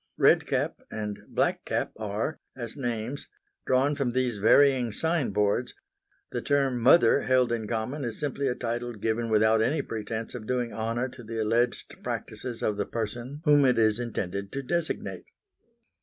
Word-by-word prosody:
Red - - +5
cap - - -1
and 105 -1 -4
Black - - 0
cap - - -1
are, 110 +8 -3 0.2
as 120 -3 -5
names, 120 0 -3 0.4
drawn 130 +3 +3
from 140 -4 -1
these 125 -4 0
varying 125 +2 +5
sign 160 +4 0
boards; 105 +4 0 0.6
the - - -2
term 135 -3 +1
Mother 130 +1 +6
held 130 -2 +2
in 115 -2 -2
common 120 +6 -2
is 115 -3 -3
simply 140 -1 -1
a 125 - 0
title 120 0 -3
given 115 +2 -1
without 110 0 +4
any 140 +8 +1
pretence 110 0 -4
of 115 -4 -7
doing 125 -3 -1
honour 115 +3 -1
to 125 -1 -12
the 115 0 -5
alleged 120 +3 0
practices 125 -3 -5
of 105 -1 0
the 100 - 0
person 120 +6 -4
whom 145 -1 +6
it 125 -3 +4
is 110 0 +3
intended 100 -4 -3
to 140 0 -3
designate. 170 +3 -2
120 Hz, 165 wpm, -27 LUFS, 110-130 Hz, 0.6 s, Mother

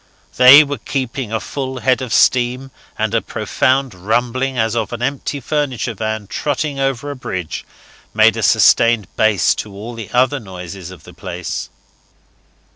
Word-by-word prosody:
They 130 +4 +9
were 145 -3 -5
keeping 130 -2 -4
a 110 - -1
full 130 -1 -5
head 130 0 +2
of 130 -3 -5
steam, 125 +3 +2 0.3
and - - -1
a - - +2
profound 130 -1 0
rumbling, 120 +7 -1
as 110 0 0
of 115 -2 -2
an 120 0 -4
empty 140 +2 -2
furniture 130 -5 -2
van 110 0 -3
trotting 145 +5 -3
over 135 +1 -1
a - - -6
bridge, 95 - -5 0.5
made - - +4
a - - -3
sustained 115 -3 +4
bass 100 -9 +3
to 105 - -12
all 105 +5 -8
the 115 -3 -8
other 130 +3 +2
noises 95 -3 -9
of 90 -4 -13
the 90 - -14
place. 90 0 -6
120 Hz, 160 wpm, -18 LUFS, 105-135 Hz, 0.5 s, They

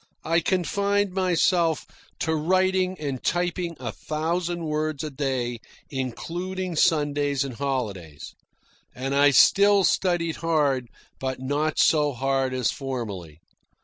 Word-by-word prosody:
I 165 +1 +2
confined 200 +2 0
myself 180 -3 +2 0.4
to 160 - +1
writing 185 +3 +1
and 140 -4 -4
typing 175 -1 -1
a - - -4
thousand 170 +2 -2
words 155 -1 -2
a 155 - -4
day, 130 -4 -2 0.3
including 175 +8 -4
Sundays 145 -3 +2
and 135 -2 -5
holidays; 110 - -4 0.6
and 135 +2 -3
I 145 +1 +5
still 200 +8 +5
studied 175 -2 +1
hard, 145 -6 +1 0.3
but 130 -1 -3
not 145 +4 -1
so 150 -2 +3
hard 135 +1 0
as 130 -2 0
formerly. 105 - -6
150 Hz, 115 wpm, -25 LUFS, 135-175 Hz, 0.6 s, I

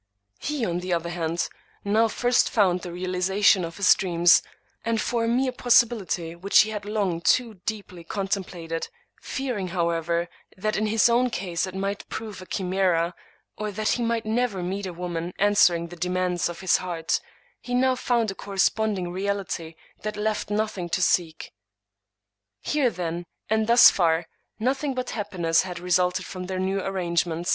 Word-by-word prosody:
He, 295 -5 -2
on 175 -2 -1
the 180 0 -2
other 170 0 -1
hand, 170 -1 -1 0.4
now 220 +3 +3
first 245 +2 +2
found 185 -6 +2
the 175 - -7
realization 185 +2 +2
of 165 0 -6
his 200 -2 +6
dreams, 175 -2 +4 0.4
and 230 -1 0
for 230 +1 0
a - - -1
mere 255 +3 +1
possibility 230 -9 +2
which 190 +4 +5
he 215 - -1
had 210 -1 -5
long 200 -5 -1
too 225 -1 +1
deeply 200 -5 -5
contemplated, 180 -4 -3 0.3
fearing, 245 -8 -3
however, 170 -1 0 0.3
that 215 +3 -1
in 215 - 0
his 220 +1 +4
own 245 +2 +3
case 180 -4 -2
it 185 - -8
might 195 +1 -3
prove 215 -4 -6
a 185 - -11
chimera, 180 -3 0 0.5
or 210 0 -2
that 215 +2 -1
he 245 - +1
might 230 -1 -1
never 220 -4 0
meet 190 +2 -3
a 180 - -6
woman 175 0 -4
answering 180 -5 +3
the 175 - -9
demands 180 0 -1
of 175 - -8
his 185 -3 +3
heart, 170 -3 -2 0.4
he 245 - -3
now 260 +1 +3
found 235 -4 0
a - - -6
corresponding 195 -1 0
reality 190 -4 -3 0.3
that 210 0 -4
left 215 0 -1
nothing 210 -4 -2
to 170 - 0
seek. 165 -3 0 1.1
Here, 290 -4 +2
then, 175 -3 -4 0.2
and 220 0 +2
thus 235 0 +8
far, 165 -2 +2 0.3
nothing 265 +4 -1
but 255 0 -3
happiness 180 -6 +1
had 180 -1 -6
re 180 +1 -6
sulted 180 +1 +2
from 185 -1 -6
the 190 0 -3
new 190 +1 0
arrangement. 175 -3 -1
190 Hz, 170 wpm, -25 LUFS, 175-215 Hz, 1.1 s, thus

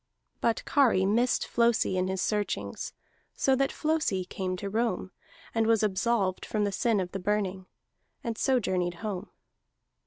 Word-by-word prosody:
But 230 - 0
Kari 245 -10 +4
missed 235 +5 +2
Flosi 235 -5 +2
in 185 0 +1
his 190 0 -1
searchings; 210 -1 -2 0.4
so 270 - +3
that 270 +1 +1
Flosi 305 - 0
came 185 0 -3
to 200 - -4
Rome, 215 -3 -1 0.4
and 225 -1 +2
was 225 -1 +3
absolved 195 -1 +1
from 210 -1 -1
the 205 - +1
sin 225 +1 +1
of 180 -1 -3
the 195 - -4
Burning, 190 -1 -1 0.6
and 230 -2 -2
so 260 +2 +2
journeyed 180 -4 -1
home. 205 -1 -4
210 Hz, 155 wpm, -29 LUFS, 190-235 Hz, 0.6 s, Kari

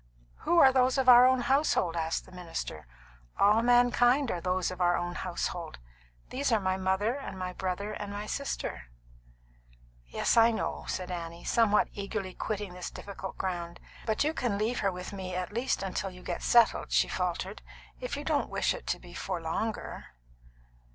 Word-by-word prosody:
"Who 345 - +1
are 270 -5 +8
those 255 0 +3
of 265 -1 +1
our 250 0 +9
own 260 -1 +3
household?" 265 - +2
asked 165 0 -1
the - - -16
minister. 165 - -6 0.5
"All 210 +3 +5
mankind 245 +2 +4
are 175 - -3
those 185 0 0
of 185 0 -6
our 175 0 +3
own 175 0 -3
household. 175 -2 -4 0.5
These 275 0 -1
are 225 - +4
my 185 -1 0
mother 190 +4 0
and 275 -9 -7
my 185 0 -4
brother 190 +3 -3
and 205 -1 -5
my 205 +1 -5
sister." 280 - -4 1.2
"Yes, - - 0
I 230 0 +7
know," 225 - -3
said 185 0 -3
Annie, 170 -1 -6
somewhat 215 -3 +3
eagerly 200 -2 -4
quitting 205 -2 -4
this 180 0 -6
difficult 195 -1 -8
ground. 175 -2 -4 0.3
"But 220 +3 +2
you 305 +2 0
can 235 -9 -1
leave 220 +4 0
her 195 - +1
with 180 +2 -7
me 185 -2 -5
at 185 +2 -3
least 235 -3 0
till 195 - -2
you 180 -1 -13
get 175 - -4
settled," 235 - +4
she - - +4
faltered, 60 - -3 0.4
"if - - -4
you - - -5
don't - - 0
wish - - +1
it - - -9
to - - -1
be - - -13
for - - -3
longer." - - -3
195 Hz, 180 wpm, -29 LUFS, 180-235 Hz, 1.2 s, our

